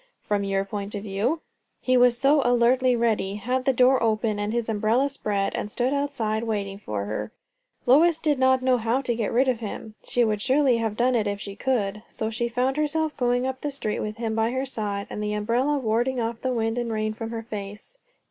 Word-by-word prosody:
"From 205 -2 -1
your 195 0 0
point 200 +1 -5
of 205 - -5
view." 215 +10 -1 0.4
He 255 - +1
was 245 -1 +5
so 280 +3 +4
alertly 245 +1 +3
ready, 220 -4 0
had 250 +5 -2
the 270 - +4
door 255 +1 +4
open 215 -1 +1
and 205 +1 -1
his 235 -1 -1
umbrella 225 +5 +1
spread, 205 -7 -1
and 210 - -3
stood 250 +5 0
outside 255 -7 -1
waiting 200 -3 -3
for 105 - -4
her, 110 - -4 0.5
Lois 310 +6 +5
did 300 -4 0
not 260 0 +3
know 255 -1 +3
how 230 +4 0
to 245 -3 -1
get 225 -3 -1
rid 260 +3 +3
of 250 -3 +1
him. 220 0 -6
She 245 -1 +1
would 210 -2 -1
surely 265 0 +3
have 220 -2 -2
done 250 +2 +3
it 220 -4 +1
if 200 0 -2
she 200 -1 -7
could. 210 -6 -1
So 220 0 -3
she 235 +2 -1
found 255 +3 0
herself 305 +1 0
going 245 0 +1
up 260 0 -3
the 295 - -2
street 270 -7 -3
with 215 +1 -4
him 225 -1 -2
by 225 +1 +1
her 260 +2 -2
side, 205 -6 -3
and 210 - -4
the 210 0 -1
umbrella 235 +8 +1
warding 245 +1 0
off 230 0 -3
the 260 - -1
wind 225 0 0
and 235 -1 -2
rain 215 0 -1
from 225 0 -6
her 225 -1 -5
face. 210 - -8
230 Hz, 225 wpm, -25 LUFS, 210-260 Hz, 0.5 s, was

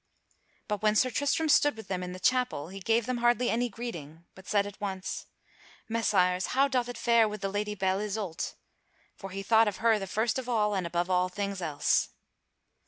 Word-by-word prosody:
But 210 -2 -2
when 215 0 +3
Sir 255 +4 +3
Tristram 285 +5 +1
stood 290 -3 +4
with 220 - -9
them 185 -2 -2
in 180 0 -5
the 185 - -8
chapel, 250 - +1
he 195 +1 -8
gave 225 +4 +1
them 250 0 -1
hardly 240 +1 +2
any 245 +1 0
greeting, 170 -8 -8
but 190 0 -15
said 205 -1 +2
at 205 0 -10
once: 190 -2 -4 0.6
"Messires, 190 -5 +1
how 275 +1 +5
doth 250 -3 0
it 245 - -6
fare 235 -2 +4
with 210 -1 -7
the 195 - -1
Lady 210 +1 -2
Belle 190 0 0
Isoult?" 205 -5 -3 0.6
For 195 - -8
he 195 +1 -5
thought 225 +2 +4
of 205 - -2
her 225 -1 +3
the 195 - -5
first 220 +6 0
of 250 -1 -6
all 210 -3 +2
and 185 -3 -1
above 175 +2 -1
all 180 0 +2
things 200 0 -4
else. 155 -4 +1
210 Hz, 205 wpm, -29 LUFS, 185-235 Hz, 0.6 s, how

